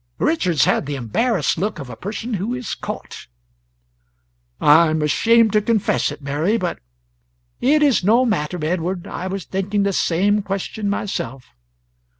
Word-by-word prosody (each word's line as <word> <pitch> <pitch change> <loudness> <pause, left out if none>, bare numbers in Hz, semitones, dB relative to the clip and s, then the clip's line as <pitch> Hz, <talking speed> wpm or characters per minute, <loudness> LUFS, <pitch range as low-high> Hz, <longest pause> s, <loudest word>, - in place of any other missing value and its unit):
Richards 165 -3 +2
had - - +1
the 145 - -3
embarrassed 155 - 0
look 205 +3 -2
of 140 -4 -7
a 125 - -8
person 215 - -5
who 210 +5 -2
is 250 -2 -4
caught. - - -7 1.3
"I 160 +3 +6
am 155 0 0
ashamed 225 +9 +3
to 210 - +4
confess 215 -8 +1
it, 145 0 -10
Mary, 155 +10 0
but 180 -5 -3 0.4
" - - -44
"It's 285 -4 +3
no 230 +6 +4
matter, 180 -7 -1
Edward, 175 +2 -2
I 185 - -5
was 190 -1 -4
thinking 200 +2 -1
the 200 0 0
same 200 +5 +2
question 200 +1 -3
myself." 135 - -3
190 Hz, 155 wpm, -20 LUFS, 150-215 Hz, 1.3 s, I